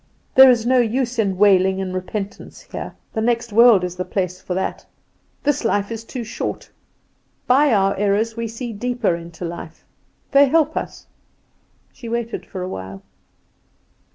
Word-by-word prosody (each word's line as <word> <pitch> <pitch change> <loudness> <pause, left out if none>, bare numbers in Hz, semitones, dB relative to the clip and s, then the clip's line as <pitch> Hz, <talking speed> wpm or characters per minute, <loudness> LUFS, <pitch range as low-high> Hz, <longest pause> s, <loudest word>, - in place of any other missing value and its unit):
There 265 0 +9
is 235 -3 +3
no 255 +1 +4
use 240 +1 0
in 195 -4 +1
wailing 190 -1 +4
and 185 -1 -3
repentance 195 +2 -6
here: - - -8 0.2
the 220 - -1
next 235 -1 0
world 230 -4 +6
is 180 0 -4
the 185 - -2
place 185 -1 -3
for 180 - -4
that; 190 - -3 0.6
this 290 -3 +1
life 205 -2 0
is 225 0 -5
too 240 +1 -6
short. 220 - -5 0.7
By 275 +3 +4
our 195 -2 +2
errors 205 +3 0
we 230 0 -3
see 230 +1 -6
deeper 240 -3 -1
into 170 0 -8
life. 170 -1 -8 0.5
They 280 0 +6
help 315 +2 +2
us." - - -5 0.9
She 235 -3 -9
waited 235 0 -4
for 185 -2 -6
a - - -4
while. 95 - -7
220 Hz, 160 wpm, -21 LUFS, 185-240 Hz, 0.9 s, There